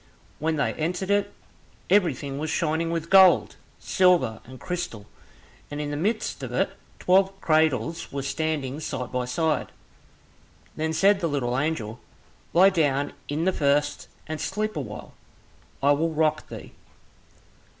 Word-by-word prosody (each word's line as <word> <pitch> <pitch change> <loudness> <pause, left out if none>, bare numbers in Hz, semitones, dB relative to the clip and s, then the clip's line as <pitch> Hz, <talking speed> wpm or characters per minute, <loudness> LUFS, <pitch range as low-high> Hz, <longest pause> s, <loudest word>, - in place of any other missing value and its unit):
When 160 +1 0
they 150 - 0
entered 180 +5 -2
it, 205 0 +1 0.6
everything 145 -8 +1
was 155 +1 -3
shining 160 +1 0
with 165 0 -3
gold, 190 -2 +6 0.2
silver, 175 - +2
and 130 +1 -12
crystal, 175 - -5 0.6
and 145 - -5
in 145 -1 -3
the - - -2
midst 210 +9 -1
of - - -5
it - - 0 0.3
twelve 195 +1 +2
cradles 155 - +1
were 140 -1 -4
standing 145 -1 -2
side 130 -5 -4
by 125 -1 -1
side. 150 +4 -1 1.0
Then 160 +1 -1
said 195 +4 +4
the 170 - 0
little 125 -4 -1
angel, 125 -6 -2 0.5
"Lie 190 +3 +6
down 145 -5 +1 0.2
in 155 +3 -1
the 190 - +2
first, 145 -1 +1 0.2
and 155 -1 -5
sleep 215 +1 -2
a 150 - -2
while, 105 -5 -9 0.7
I 140 - +5
will 155 +3 +2
rock 155 -1 0
thee." - - -9
155 Hz, 145 wpm, -25 LUFS, 140-175 Hz, 1.0 s, gold